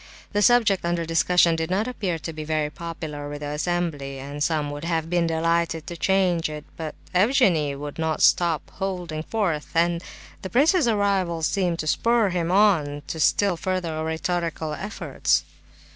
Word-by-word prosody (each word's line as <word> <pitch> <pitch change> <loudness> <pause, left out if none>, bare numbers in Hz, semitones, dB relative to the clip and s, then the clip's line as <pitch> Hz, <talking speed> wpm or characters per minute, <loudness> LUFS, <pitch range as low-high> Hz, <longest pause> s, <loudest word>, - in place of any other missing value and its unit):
The 205 - +2
subject 225 -4 +4
under 170 -1 -1
discussion 170 +1 +3
did 160 0 -2
not 200 +5 0
appear 195 -9 -2
to 165 +1 -6
be 155 0 -6
very 155 -1 -1
popular 155 -3 -6
with 145 0 -7
the 145 - -4
assembly, 150 -3 -2
and 140 +2 -7
some 150 -2 0
would 145 +1 -7
have 165 -1 -2
been 175 -1 +2
delighted 165 0 0
to 175 - -6
change 180 -2 +1
it; 150 -1 -7
but 160 -2 -6 0.2
Evgenie 180 - +3
would 145 +2 -7
not 160 -1 0
stop 170 -4 +3
holding 180 -5 -3
forth, 170 -5 -2
and 170 +1 +2 0.4
the 190 - -5
prince's 295 - +3
arrival 195 -6 +1
seemed 180 0 +1
to 155 - -4
spur 230 +6 +2
him 170 -2 -1
on 165 -8 +3
to 160 - -5
still 190 +5 +3
further 180 -2 -2
oratorical 160 0 -2
efforts. 210 +7 -1
170 Hz, 165 wpm, -24 LUFS, 155-185 Hz, 0.4 s, subject